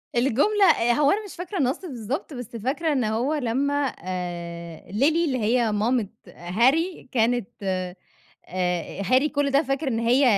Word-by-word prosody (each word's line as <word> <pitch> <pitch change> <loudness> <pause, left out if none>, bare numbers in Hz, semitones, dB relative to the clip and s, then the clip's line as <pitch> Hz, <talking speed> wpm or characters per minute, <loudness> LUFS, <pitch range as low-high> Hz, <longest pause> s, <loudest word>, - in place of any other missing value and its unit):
الجملة 270 - +3
هو 290 +2 +3
أنا 425 +2 0
مش 400 - -10
فاكرة 360 +3 -5
النص 265 -3 +1
بالضبط، 270 - -4
بس 245 -3 -8
فاكرة 275 +8 -1
إن 260 -4 +1
هو 225 +7 0
لمّا 280 0 0 0.3
آآ، 170 -2 -6
Lily 215 +7 0
اللي 315 -3 +2
هي 230 0 +2
مامت 215 0 +1 0.2
Harry 260 - +1
كانت 240 -2 +1
آآ، 185 -1 -2 1.1
Harry 255 +9 +3
كل 285 -1 +1
ده 280 +3 +4
فاكر 275 +2 -2
إن 230 -3 0
هي 245 +4 +3
250 Hz, 150 wpm, -24 LUFS, 215-285 Hz, 1.1 s, ده